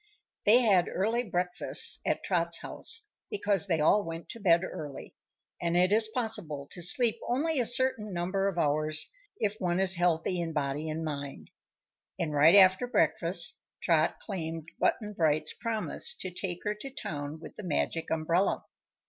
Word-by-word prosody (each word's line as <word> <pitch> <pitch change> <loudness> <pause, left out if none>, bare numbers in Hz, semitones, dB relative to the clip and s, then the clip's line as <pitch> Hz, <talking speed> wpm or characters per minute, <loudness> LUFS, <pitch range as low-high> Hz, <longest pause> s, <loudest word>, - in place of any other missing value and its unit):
They 235 +4 +7
had 195 -7 +3
early 225 +6 0
breakfasts 180 -5 +3
at - - 0
Trot's 170 -2 -1
house, 460 -2 -2 0.2
because 205 - +1
they 165 -4 +1
all 200 +7 +4
went 165 -1 -7
to 230 - -8
bed 170 -4 +3
early 150 -6 -8 0.5
and 170 0 0
it 180 +3 +3
is 220 0 +3
possible 220 - -4
to 175 - -5
sleep 225 +6 +4
only 290 +4 0
a 240 - +1
certain 245 -4 +1
number 185 +2 -1
of 195 -3 -3
hours 155 0 +1 0.3
if 210 0 -1
one 175 0 0
is 190 -1 +4
healthy 175 0 +1
in 165 -1 -4
body 150 +1 -2
and 160 +1 -4
mind. 140 - -6 0.7
And 155 -3 -2
right 155 +5 +6
after 190 +4 +6
breakfast 170 -4 +1 0.2
Trot 160 -2 +2
claimed 165 -5 -6
Button 210 -1 0
Bright's 155 -4 0
promise 225 -2 -3
to 185 - -6
take 180 -1 -5
her 210 - -1
to 210 +6 -9
town 150 - -6
with - - -11
the - - -8
Magic 165 -2 -2
Umbrella. 165 +4 0
175 Hz, 165 wpm, -29 LUFS, 160-210 Hz, 0.7 s, They